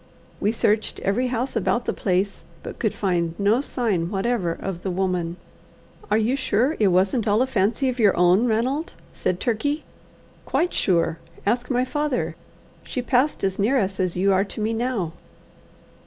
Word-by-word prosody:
We 210 - +2
searched 215 -1 0
every 235 +6 +1
house 250 +1 -2
about 235 +3 0
the - - 0
place, 190 +1 -1 0.2
but - - -8
could - - +1
find 170 -4 0
no 210 +5 +3
sign 210 -12 -1
whatever 200 -2 0
of 175 +1 -5
the 190 - -3
woman. 180 -2 -1 0.7
"Are 210 - +3
you 225 +4 +2
sure 260 +2 +1
it 210 - +4
wasn't 190 +5 +2
all 215 +4 +4
a - - +1
fancy 230 +2 +1
of 255 -1 -2
your 210 -3 +4
own, 180 +7 +4
Ranald?" 255 +9 0 0.2
said 180 - -1
Turkey. 285 +6 -1 0.6
"Quite 350 - 0
sure. 170 -3 +1 0.3
Ask 240 +4 0
my 250 -1 +1
father. 295 -1 -1 0.5
She 250 - -4
passed 260 +4 +1
as 190 0 0
near 230 +7 +3
us 195 -2 -2
as 180 -2 0
you 195 +2 +3
are 190 +1 +3
to 205 - -7
me 215 +1 0
now." 225 -8 -1
215 Hz, 170 wpm, -23 LUFS, 190-250 Hz, 0.7 s, it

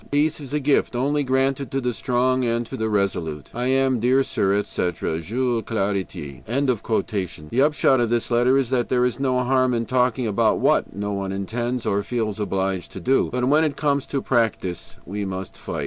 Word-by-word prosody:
"Peace 150 +2 +1
is 140 - -8
a 150 - 0
gift 140 -3 +1
only 145 +4 +1
granted 135 0 0
to 135 - -1
the 125 -2 -1
strong 130 +2 +1
and 120 0 0
the 110 -1 -3
resolute. 85 -8 -1
"I 125 +2 -2
am, 130 -1 +2
dear 130 +4 +3
sir, 95 -6 0
etc., 90 -5 -1
"JULES 120 +3 -1
CLARETIE." 95 - -3
The 110 - -1
upshot 140 -2 +3
of 120 -2 +1
this 120 +1 -1
letter 120 +3 +4
is 130 -2 0
that 125 -2 +1
there 125 -1 +3
is 125 +1 -1
no 130 -2 +1
harm 130 0 +2
in 115 0 -1
talking 125 0 +1
about 105 -3 +2
what - - +1
no 105 +1 -3
one 100 -1 -3
intends 120 +5 -3
or 100 +1 +1
feels 110 -2 -2
obliged 95 -2 -2
to - - -6
do. 130 +10 +2
But 125 0 0
when 150 +4 +4
it 145 -3 -1
comes 140 -2 0
to 135 -2 -2
practice, 110 -8 -1
we 100 +3 -4
must 95 -1 -5
fight. - - -5
120 Hz, 195 wpm, -23 LUFS, 100-130 Hz, -, letter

